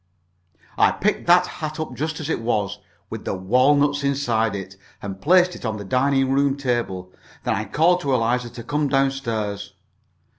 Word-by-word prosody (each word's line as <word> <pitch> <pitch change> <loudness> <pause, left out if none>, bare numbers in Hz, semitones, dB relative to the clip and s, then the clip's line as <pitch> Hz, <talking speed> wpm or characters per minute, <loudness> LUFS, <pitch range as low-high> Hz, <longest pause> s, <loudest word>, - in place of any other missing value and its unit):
I - - +6
picked - - -1
that 180 +1 +6
hat 155 -3 -6
up 155 -5 -4
just 155 +4 -3
as 155 - -5
it 160 - -1
was, 105 -4 -1 0.3
with - - -6
the - - -2
walnuts 140 +9 +2
inside 120 -6 0
it, 95 -1 -7 0.2
and 95 -1 -7
placed 180 +2 +4
it - - -11
on 110 -2 -2
the 100 - -7
dining 135 +4 +2
room 140 0 +2
table. 120 -9 -2 0.3
Then - - 0
I 110 +2 -2
called 170 - +2
to 140 -4 0
Eliza 120 +1 0
to 115 - -9
come 150 +4 0
down 135 0 +2
stairs. 105 -6 -4
130 Hz, 180 wpm, -22 LUFS, 110-145 Hz, 0.3 s, I